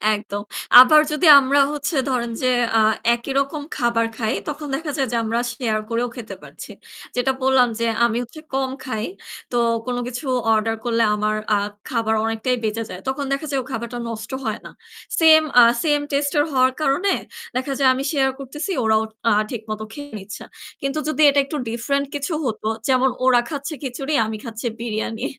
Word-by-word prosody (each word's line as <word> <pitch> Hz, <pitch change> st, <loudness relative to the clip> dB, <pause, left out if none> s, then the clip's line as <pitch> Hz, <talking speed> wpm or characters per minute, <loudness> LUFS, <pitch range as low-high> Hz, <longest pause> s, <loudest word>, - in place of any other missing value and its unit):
একদম। 205 Hz, -1 st, -6 dB, 0.4 s
আবার 305 Hz, +4 st, +7 dB
যদি 305 Hz, +3 st, +2 dB
আমরা 275 Hz, +2 st, +2 dB
হচ্ছে 300 Hz, +2 st, -3 dB
ধরেন 240 Hz, -2 st, -1 dB
যে 255 Hz, -, +3 dB, 0.3 s
আ -, -, +5 dB, 0.3 s
একই 235 Hz, +3 st, -7 dB
রকম 280 Hz, +2 st, -2 dB, 0.2 s
খাবার 235 Hz, -1 st, +1 dB
খাই, 225 Hz, +1 st, -1 dB
তখন 300 Hz, 0 st, -5 dB
দেখা 305 Hz, +1 st, -4 dB
যায় 270 Hz, -2 st, 0 dB
যে 235 Hz, -, 0 dB
আমরা 225 Hz, +1 st, -1 dB
share 230 Hz, -4 st, -2 dB
করেও 235 Hz, +1 st, -1 dB
খেতে 235 Hz, -4 st, -8 dB
পারছি। -, -, -11 dB, 0.4 s
যেটা 250 Hz, +2 st, +1 dB
বললাম 265 Hz, -1 st, +4 dB
যে 230 Hz, -, 0 dB, 0.2 s
আমি 235 Hz, -1 st, 0 dB
হচ্ছে 275 Hz, +6 st, -12 dB
কম 265 Hz, 0 st, 0 dB, 0.2 s
খাই। 220 Hz, -4 st, -3 dB, 0.5 s
তো 240 Hz, -, 0 dB, 0.3 s
কোন 250 Hz, -1 st, -2 dB
কিছু 250 Hz, +3 st, -6 dB, 0.3 s
order 225 Hz, +1 st, +1 dB
করলে 230 Hz, -1 st, +2 dB
আমার 210 Hz, 0 st, 0 dB, 0.2 s
আ -, -, +3 dB, 0.3 s
খাবার 225 Hz, -3 st, 0 dB
অনেকটাই 225 Hz, +3 st, 0 dB
বেঁচে 220 Hz, +1 st, -1 dB
যায়। 180 Hz, -, -7 dB
তখন 270 Hz, +2 st, -2 dB
দেখা 275 Hz, +3 st, -1 dB
যায় 275 Hz, -, 0 dB
ও -, -, -16 dB
খাবারটা 235 Hz, 0 st, -4 dB
নষ্ট 220 Hz, +1 st, -7 dB
হয় 220 Hz, -1 st, -2 dB
না। -, -, -9 dB, 0.5 s
Same 315 Hz, -1 st, +7 dB, 0.2 s
আ -, -, +9 dB, 0.2 s
same 295 Hz, -2 st, +2 dB
taste 285 Hz, 0 st, 0 dB
এর -, -, +4 dB
হওয়ার 260 Hz, 0 st, +3 dB
কারণে 310 Hz, +8 st, +1 dB, 0.4 s
দেখা 260 Hz, +2 st, -1 dB
যায় 265 Hz, -, +5 dB
আমি 260 Hz, +1 st, -3 dB
share 270 Hz, -3 st, +2 dB
করতেছি, 295 Hz, +8 st, -5 dB
ওরাও 220 Hz, 0 st, +3 dB, 0.3 s
আ -, -, +3 dB, 0.2 s
ঠিকমতো 215 Hz, -2 st, -5 dB
খেয়ে 285 Hz, +2 st, -9 dB
নিচ্ছে। 200 Hz, +1 st, -9 dB, 0.4 s
কিন্তু 275 Hz, +2 st, -2 dB
যদি 310 Hz, 0 st, -1 dB
এটা 280 Hz, -, +3 dB
একটু 295 Hz, +2 st, -5 dB
different 280 Hz, +5 st, -1 dB
কিছু 290 Hz, +4 st, -3 dB
হতো, 220 Hz, -3 st, -3 dB, 0.2 s
যেমন 260 Hz, 0 st, +4 dB, 0.2 s
ওরা 255 Hz, -2 st, +5 dB
খাচ্ছে 285 Hz, +1 st, -5 dB
খিচুড়ি, 270 Hz, +3 st, -4 dB
আমি 220 Hz, 0 st, -4 dB
খাচ্ছি 230 Hz, 0 st, -5 dB
বিরিয়ানি। 225 Hz, -1 st, -3 dB
255 Hz, 185 wpm, -21 LUFS, 225-280 Hz, 0.5 s, আ